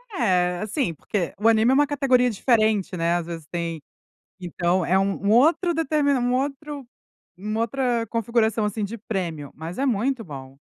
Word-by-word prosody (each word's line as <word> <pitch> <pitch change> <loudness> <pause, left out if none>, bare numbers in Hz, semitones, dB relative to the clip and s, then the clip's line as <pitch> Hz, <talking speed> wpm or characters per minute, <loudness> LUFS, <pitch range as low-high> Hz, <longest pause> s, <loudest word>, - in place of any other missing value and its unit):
É 180 - +1
assim 215 - -1
porque 175 +2 -3
o 220 - +2
anime 225 +2 +4
é - - +4
uma 290 +2 +4
categoria 260 -3 +2
diferente, 215 -4 +1
né, 170 0 +1
às 175 -1 -2
vezes 165 -3 -7
tem, 170 -2 -4 0.6
então 175 0 0
é 190 +2 +3
um 195 0 0
um 200 - +2
outro 320 - +4
deter 310 -2 0
um 250 -3 +2
outro 280 0 -3 0.5
uma 215 +3 -3
outra 235 -1 0
configuração 225 0 0
assim 210 0 -1
de 225 +4 -7
prêmio, 170 - -4
mas 165 +4 -7
é 275 - 0
muito 250 +1 0
bom, 135 -5 -10
220 Hz, 175 wpm, -24 LUFS, 180-255 Hz, 0.6 s, anime